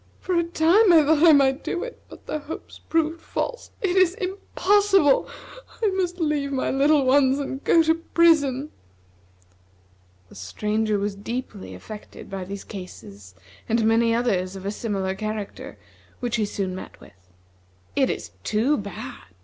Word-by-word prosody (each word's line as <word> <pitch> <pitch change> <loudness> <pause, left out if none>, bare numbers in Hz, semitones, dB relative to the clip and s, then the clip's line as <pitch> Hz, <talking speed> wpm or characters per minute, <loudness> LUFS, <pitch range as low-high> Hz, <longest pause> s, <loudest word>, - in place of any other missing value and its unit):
For 370 - -3
a 340 -1 +3
time 345 +5 +4
I 320 -3 +6
thought 305 0 +3
I 335 -1 +8
might 275 -1 +3
do 355 - -3
it, 485 - -8
but - - -14
the 305 - -3
hopes 295 +2 -9
proved 325 0 0
false. - - -4
It 370 -2 +1
is 370 -1 +4
impossible. 390 -4 +2 0.5
I 430 - +4
must 365 -1 -2
leave 295 -3 0
my 265 -1 -1
little 280 +1 +3
ones, 265 0 +4
and 275 -1 -5
go 330 - +5
to 320 0 +3
prison." 315 -4 +2 1.6
The - - -18
Stranger 210 - -1
was 200 0 -2
deeply 220 0 -6
affected 215 -2 -11
by 190 -1 -4
these 200 +1 -7
cases 100 - -11 0.3
and 225 0 +2
many 230 +1 +3
others 195 -6 0
of 190 0 -9
a 200 - -1
similar 195 -4 -2
character, 215 +1 -6 0.4
which 240 -2 -1
he 215 - +1
soon 195 -2 -3
met 185 - -9
with. - - -16 0.8
"It - - +2
is 85 - -4
too 230 - +1
bad! 200 -10 -7
265 Hz, 155 wpm, -24 LUFS, 205-325 Hz, 1.6 s, I